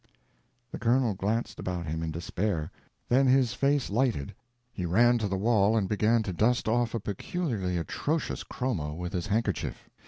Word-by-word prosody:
The - - -6
Colonel 120 -1 +2
glanced 105 +5 -2
about 90 -2 -3
him 80 +1 -3
in 80 - -2
despair. 85 +1 -2 0.4
Then 130 +2 +4
his 130 -2 +4
face 140 -1 +1
lighted; 115 - 0 0.4
he 90 - -4
ran 120 +8 +4
to 105 - -1
the 95 -1 -1
wall 105 +1 +3
and 100 -3 +1
began 110 +3 +2
to 95 - -3
dust 115 +6 +2
off 120 +1 +1
a - - 0
peculiarly 100 - -2
atrocious 145 - -2
chromo 85 - -3
with 90 +1 -5
his 90 +2 -2
handkerchief. 105 -3 -2
110 Hz, 165 wpm, -28 LUFS, 90-120 Hz, 0.4 s, Then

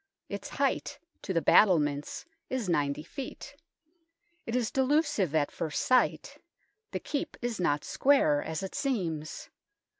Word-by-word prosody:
Its - - -5
height - - -1 0.2
to - - -4
the 165 -3 +1
battlements 150 -8 +3 0.2
is 255 -6 -2
90 145 -3 0
ft. 265 - -8 0.9
It 230 - -2
is 245 -3 0
delusive 265 - +1
at 145 -2 +2
first 155 -2 -3
sight; 255 -1 +2 0.5
the - - -3
Keep 285 - -4
is 240 -4 -3
not 145 -4 +1
square, 210 - +3
as 160 +2 -4
it 190 - -5
seems. 175 - -3
185 Hz, 130 wpm, -29 LUFS, 150-255 Hz, 0.9 s, battlements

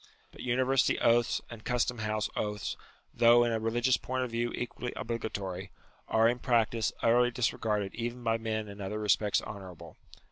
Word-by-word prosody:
But - - -12
univer 130 +2 +1
sity - - +3
oaths 120 0 +3
and 115 -2 -9
custom 125 -1 0
house 110 0 -1
oaths, 105 -1 -2 0.4
though 120 0 +6
in 120 - +1
a 110 - 0
religious 120 +2 +2
point 130 +3 -2
of 125 - -4
view 120 +1 -1
equally 125 0 -4
obligatory, 100 -5 -4 0.4
are 110 0 +4
in 120 +1 +1
practice 115 -2 +1
utterly 120 +1 +4
disregarded 105 -4 -1
even 120 +1 -4
by 115 -1 +1
men 110 -1 -2
in 100 0 -9
other 100 +2 -3
respects 105 0 +2
honourable. 95 -5 -9
115 Hz, 170 wpm, -30 LUFS, 105-120 Hz, 0.4 s, though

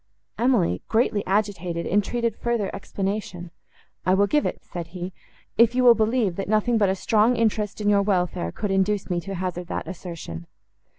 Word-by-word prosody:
Emily, 225 - +2
greatly 220 -3 +1
agitated, 190 -4 -1
entreated 225 +3 0
further 235 -4 -1
explanation. 195 -3 -4 0.5
"I 185 - +3
will 200 +1 +4
give 295 +8 +1
it," - - -5
said 170 -3 -6
he, 180 +1 -5 0.5
"if 235 +1 +5
you 255 - +3
will 245 -1 +9
believe, 220 -4 +1
that 195 - -3
nothing 220 +2 +2
but 200 -2 +3
a 190 - +1
strong 220 +4 +3
interest 215 -3 0
in 210 - -2
your 205 -1 +4
welfare 180 - 0
could 205 - -3
induce 195 0 +1
me 175 -1 0
to 195 +2 -6
hazard 180 -1 -4
that - - -4
assertion." 165 - -7
200 Hz, 175 wpm, -24 LUFS, 180-220 Hz, 0.5 s, will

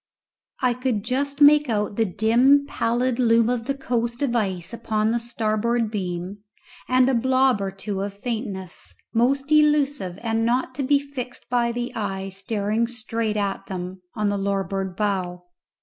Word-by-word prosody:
I 250 -1 +4
could 245 -4 -1
just 280 +4 -2
make 295 -1 +7
out 210 -2 -1
the 225 - +2
dim 240 +8 +4
pallid 245 -1 0
loom 230 -1 +4
of 240 -2 -2
the 275 - -1
coast 240 -1 -2
of 245 -4 0
ice 190 -3 -2
upon 220 -2 0
the 235 - +1
starboard 230 0 -1
beam, 185 -1 -4 0.5
and 255 0 +4
a 265 - +2
blob 260 -1 +3
or 195 - -1
two 195 0 -5
of 200 +1 -3
faintness 200 -4 -5 0.2
most 270 +5 +1
elusive 290 -10 +3
and 225 -1 0
not 250 +2 0
to 270 - -4
be 280 +2 +3
fixed 270 -4 -7
by 240 -1 +2
the 240 +1 -4
eye 195 -3 -3
staring 205 +3 -1
straight 225 -2 -2
at 195 -1 -2
them 185 0 -6
on 210 -2 0
the 200 0 -1
larboard 195 -1 -2
bow. 185 -4 -2
230 Hz, 165 wpm, -23 LUFS, 200-255 Hz, 0.5 s, make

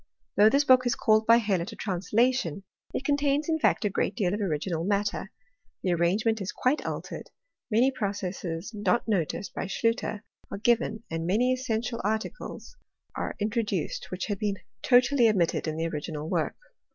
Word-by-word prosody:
Though 210 +1 +7
this 280 +4 +3
book 255 -2 +5
is 245 - +1
called 220 0 +3
by 230 0 +8
Hellot 205 -4 0
a - - -9
translation, 200 - 0 0.3
it 270 - -4
contains 285 +1 +1
in 320 -1 +1
fact 255 - +2
a - - +3
great - - -1
deal 195 -6 0
of 210 - -2
original 165 -2 -1
matter; 200 0 -1 0.5
the 185 - +1
arrange 175 +6 +1
ment 220 -1 +1
is 195 - -3
quite 265 +4 0
altered; - - -5 0.4
many 240 +4 +4
processes 195 -6 -4
not 215 +3 0
noticed 195 -1 -1
by - - -3
Schlutter 225 +1 -1 0.3
are - - -5
given, 230 0 +1
and 165 0 -2
many 240 +7 +3
essential 240 -2 -2
articles 220 - -4 0.4
are - - -3
introduced, 210 -5 -2
which 185 0 -3
had 205 -2 -3
been 205 -2 0 0.3
totally 245 -1 +5
omitted 175 -6 +1
in 155 0 -2
the 165 - -1
original 155 -1 -4
work. - - -1
210 Hz, 170 wpm, -27 LUFS, 185-240 Hz, 0.5 s, by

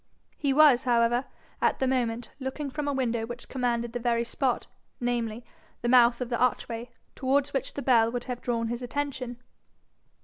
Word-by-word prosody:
He 280 - 0
was, 270 -3 +6
however, 240 +1 +3 0.4
at - - +2
the 265 - 0
moment, 240 -3 -1
looking 270 +1 -4
from 295 +1 -3
a - - +1
window 240 -4 -1
which 240 0 -8
commanded 240 -2 -1
the 245 - -2
very 235 -1 +1
spot 250 +2 -1 0.3
namely, 240 -2 -2 0.4
the 240 - +1
mouth 240 -1 +6
of 245 - -2
the 235 - -1
archway 240 -1 0 0.2
towards 275 +2 +1
which 270 - -2
the 280 - -4
bell 230 -3 +4
would 245 0 -3
have 245 -1 -5
drawn 230 -2 -1
his 240 +1 -3
attention. 255 -1 -3
245 Hz, 175 wpm, -28 LUFS, 235-265 Hz, 0.4 s, was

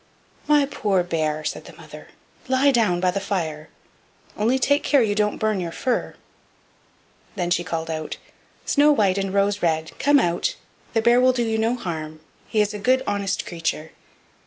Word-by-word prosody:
"My 295 -1 +4
poor 205 -9 0
bear," 155 -3 -2
said - - -4
the - - -13
mother, - - -12 0.4
"lie 265 +2 +3
down 220 -8 +2
by 180 0 +2
the 200 - -2
fire, 160 -6 -3 0.7
only 230 +5 +1
take 285 +2 +2
care 280 -4 +3
you 210 -2 0
don't 210 0 0
burn 215 -2 0
your 170 -2 -4
fur." 250 +7 -2 1.2
Then 175 -3 -2
she 175 0 +2
called 165 -2 -4
out: 155 -1 -5 0.5
"Snow 295 +1 +4
white 200 -8 +2
and 195 -1 -2
Rose 200 +1 +1
red, 160 -2 0
come 290 +1 +4
out; 175 - 0 0.4
the 225 - +1
bear 240 +2 +5
will 255 0 +4
do 245 -1 0
you 220 -1 -1
no 225 +2 +1
harm; 155 -8 -6 0.3
he 220 -2 +1
is 210 0 0
a 210 - -5
good, 260 +5 +2
honest 200 -1 -2
creature." 160 -2 -3
200 Hz, 180 wpm, -23 LUFS, 170-245 Hz, 1.2 s, bear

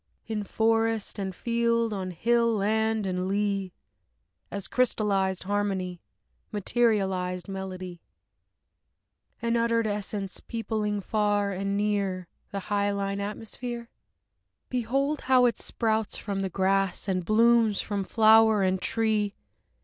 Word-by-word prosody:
In 215 -2 -3
forest 225 0 0
and 190 -2 -3
field, 230 0 +1
on 190 -2 -3
hill 230 +6 +2
land 220 +1 +1
and 185 -1 -1
lea, 200 -1 0 0.8
As 200 -1 -3
crystallized 200 -6 +1
harmony, 190 -3 -2 0.5
Materialized 195 -4 0
melody, 185 -2 -6 1.4
An 235 0 +1
uttered 230 -1 +2
essence 205 -1 -3
peopling 215 -2 -2
far 205 0 +1
and 195 +1 -2
near 200 -3 -1 0.2
The 200 - -4
hyaline 200 0 -1
atmosphere?... 230 +3 -6 0.8
Behold 270 +5 0
how 255 -1 +6
it 240 - +1
sprouts 220 -2 -1
from 200 -1 -3
the 190 - -1
grass 195 +1 0
and 185 -2 0
blooms 225 +1 +4
from 205 -2 -2
flower 220 0 +5
and 185 0 +1
tree! 215 -3 +1
205 Hz, 110 wpm, -27 LUFS, 195-225 Hz, 1.4 s, how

